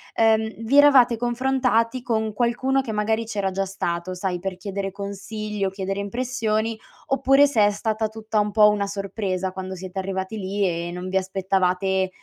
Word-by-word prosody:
ehm, 220 0 +2
vi 265 +6 +2
eravate 260 -5 +6
confrontati 245 0 +1
con 220 -3 -1
qualcuno 250 +4 +1
che 245 - -5
magari 220 +2 0
c'era 200 -3 -2
già 195 +1 -1
stato 175 -1 -3
sai, 180 -1 -2
per 190 0 -4
chiedere 195 +1 -4
consigli 200 +1 -5
o - - +1
chiedere 195 +1 -4
impressioni, 225 0 -1 0.3
oppure 270 +1 +4
se 230 -7 +3
è 205 - +3
stata 220 +1 -1
tutta 220 0 -2
un 210 0 0
po' 210 0 +6
una 205 -1 0
sorpresa 195 -2 -3
quando 190 0 -6
siete 185 +1 -6
arrivati 190 +2 -3
lì 200 +1 -1
e 170 0 -3
non 180 +1 -5
vi 190 - +1
aspettavate, 190 0 0
205 Hz, 170 wpm, -23 LUFS, 190-225 Hz, 0.3 s, eravate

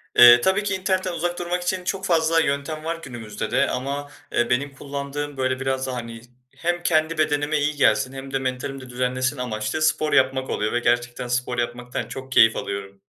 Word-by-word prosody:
Eee, 120 0 +9
tabii 190 +6 +2
ki 205 -2 -1
internetten 185 -1 -1
uzak 175 +1 -2
durmak 175 +1 -2
için 185 +1 -1
çok 190 +1 -2
fazla 165 -2 +3
yöntem 150 +1 -1
var 165 +1 -3
günümüzde 115 -5 -6
de - - +2
ama, 140 +3 -3 0.2
eee, 120 - +1
benim 135 +3 0
kullandığım 140 +1 -5
böyle 130 0 0
biraz 135 0 -1
daha, 130 - -3
hani, 115 -1 -6 0.4
hem 175 +1 -1
kendi 155 -1 +2
bedenime 150 0 +1
iyi 150 +1 0
gelsin 135 -2 +3
hem 135 0 -8
de 135 - +1
mentalimi 130 +1 -3
de 130 - -11
düzenlesin 130 +2 -1
amaçlı 120 +3 -3
spor 155 0 +2
yapmak 130 -1 +2
oluyor 105 +1 -1
ve 120 - +2
gerçekten 120 0 0
spor 125 0 -1
yapmaktan 120 +1 -3
çok 135 0 -8
keyif 115 -2 +6
alıyorum. 100 0 -5
135 Hz, 190 wpm, -23 LUFS, 125-155 Hz, 0.4 s, Eee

